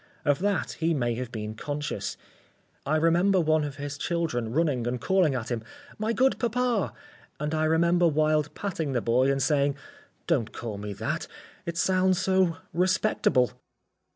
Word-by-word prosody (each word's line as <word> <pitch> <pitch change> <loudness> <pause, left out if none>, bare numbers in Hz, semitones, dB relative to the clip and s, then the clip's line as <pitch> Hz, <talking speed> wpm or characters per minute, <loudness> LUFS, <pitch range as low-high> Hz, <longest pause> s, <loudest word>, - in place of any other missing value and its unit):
Of 145 -2 +3
that 200 0 0
he 165 0 +1
may 120 -4 0
have 120 0 -5
been 105 -1 -5
conscious. 145 +5 -4 0.7
I 155 - +2
remember 175 +4 +3
one 155 -2 +2
of 145 -2 -4
his 145 0 -6
children 160 -10 -1
running 140 -5 +1
and 125 +1 -1
calling 180 -5 +2
at 120 -1 -4
him: 120 -2 -1 0.4
"My 215 +1 0
good 260 +3 +2
papa!" 240 -2 0 0.5
and 150 +1 -2
I 155 0 +1
remember 170 +2 +3
Wilde 155 -1 +2
patting 165 -8 -3
the 120 - +1
boy 125 +4 +3
and 135 -1 0
saying: 140 -1 +2 0.5
"Don't 135 -10 0
call 110 -4 -5
me 105 0 -5
that, 110 +3 -3 0.4
it 170 0 -3
sounds 185 +1 +3
so 185 -3 +2 0.2
respectable." 180 - +2
155 Hz, 160 wpm, -27 LUFS, 130-175 Hz, 0.7 s, Of